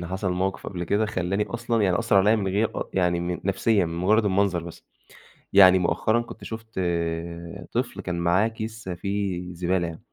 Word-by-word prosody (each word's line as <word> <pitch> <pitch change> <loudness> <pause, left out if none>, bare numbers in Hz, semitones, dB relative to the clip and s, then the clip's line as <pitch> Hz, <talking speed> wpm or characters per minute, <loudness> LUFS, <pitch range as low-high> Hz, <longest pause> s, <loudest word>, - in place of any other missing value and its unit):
إن 85 - -5
حصل 95 0 -2
موقِف 95 +2 -2
قبل 90 -2 -4
كده، 105 +5 +1
خلّاني 100 0 -1
أصلًا 120 -2 -1
يعني 95 -3 +2
أثّر 115 -3 +2
عليّا 105 +3 +5
من 100 -2 -1
غير 105 +4 0
أ - - -5
يعني 90 -2 +2
من 90 0 -3
نفسيًا، 100 0 +2
من 85 - -5
مجرّد 105 +6 +2
المنظر. 95 -3 +1
بس 85 -1 -10 0.7
يعني 95 -1 +8
مؤخرًا 110 +6 +1
كنت 120 - -11
شُفت 110 -3 -6 0.9
طفل - - -2
كان 90 -1 -3
معاه 90 +6 +3
كيس 110 -2 -7
فيه 90 -1 -3
زبالة 90 0 0
يعني 80 -1 -8
95 Hz, 185 wpm, -25 LUFS, 90-110 Hz, 0.9 s, يعني